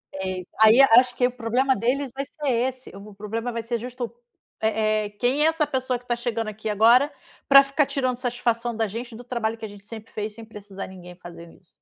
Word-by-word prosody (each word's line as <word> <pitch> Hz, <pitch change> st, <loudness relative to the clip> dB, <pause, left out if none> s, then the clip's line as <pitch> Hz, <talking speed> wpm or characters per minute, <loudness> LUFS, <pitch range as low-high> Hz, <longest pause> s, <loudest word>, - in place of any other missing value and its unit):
É 190 Hz, -1 st, -3 dB
isso. 180 Hz, -, -11 dB
Ai, 220 Hz, +3 st, +7 dB
acho 250 Hz, -1 st, +6 dB
que 245 Hz, 0 st, +3 dB
o -, -, -5 dB
problema 250 Hz, +2 st, 0 dB
deles 255 Hz, +5 st, -1 dB
vai 275 Hz, +1 st, -4 dB
ser 295 Hz, 0 st, -4 dB
esse, 255 Hz, +1 st, -1 dB
o 200 Hz, +1 st, -11 dB
problema 225 Hz, +4 st, -4 dB
vai 230 Hz, 0 st, -3 dB
ser 235 Hz, +1 st, -2 dB
justo, 245 Hz, 0 st, -6 dB, 0.5 s
eh 215 Hz, -1 st, +1 dB
eh: -, -, -6 dB
"Quem 265 Hz, +5 st, +2 dB
é -, -, +5 dB
essa 320 Hz, -2 st, +1 dB
pessoa 260 Hz, -3 st, -2 dB
que 245 Hz, -, -25 dB
tá 240 Hz, -, +1 dB
chegando 235 Hz, -2 st, -3 dB
aqui 215 Hz, +1 st, -6 dB
agora, 235 Hz, +7 st, +5 dB, 0.4 s
pra 275 Hz, 0 st, +9 dB
ficar 275 Hz, +2 st, +1 dB
tirando 255 Hz, -2 st, -1 dB
satisfação 240 Hz, -1 st, -2 dB
da 225 Hz, 0 st, 0 dB
gente, 230 Hz, +3 st, -7 dB
do 240 Hz, -, -10 dB
trabalho 235 Hz, -2 st, -2 dB
que 225 Hz, -, -7 dB
a -, -, -5 dB
gente 200 Hz, -1 st, -14 dB
sempre 220 Hz, 0 st, -10 dB
fez, 210 Hz, 0 st, -4 dB
sem 230 Hz, -, -10 dB
precisar 205 Hz, -3 st, -9 dB
ninguém 180 Hz, -1 st, -12 dB
fazendo 170 Hz, -1 st, -12 dB
isso?". 180 Hz, -, -24 dB
230 Hz, 230 wpm, -24 LUFS, 215-255 Hz, 0.5 s, pra